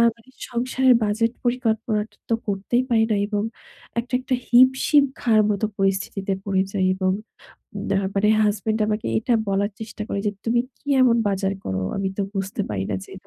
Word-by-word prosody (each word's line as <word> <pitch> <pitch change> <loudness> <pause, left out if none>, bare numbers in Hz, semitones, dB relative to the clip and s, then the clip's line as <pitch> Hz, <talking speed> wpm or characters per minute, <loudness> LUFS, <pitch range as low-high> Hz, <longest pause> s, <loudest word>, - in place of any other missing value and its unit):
মানে 230 +3 -23 0.2
সংসারের 255 +1 +3
বাজেট 220 +2 +1
পরিকল্পনাটা 225 -3 -1
তো - - +2
করতেই 205 +5 0
পারিনা 225 -2 +3
এবং 205 -1 -1 0.6
একটা, 235 +1 -6
একটা 255 0 -1
হিমশিম 260 +4 +5 0.2
খাওয়ার 220 -3 +4
মতো 205 +1 0
পরিস্থিতিতে 195 0 0
পড়ে 195 -2 +1
যাই 190 -2 0
এবং 185 0 +1 0.8
না 195 - +2 0.2
মানে 200 +1 +2
হাসব্যান্ড 215 +1 0
আমাকে 215 0 -2
এটা 235 +2 +1
বলার 200 +1 +1
চেষ্টা 220 -1 -6
করে 200 - -2
যে, - - +3
তুমি 235 +1 +2 0.2
কি - - -36 0.2
এমন 240 -2 +5
বাজার 195 0 0
করো 95 0 -2 0.2
আমি 195 -1 -1
তো - - +2
বুঝতে 195 0 -3
পারি 95 -2 -2
না 95 - 0
যে - - -14
215 Hz, 165 wpm, -23 LUFS, 195-235 Hz, 0.8 s, হিমশিম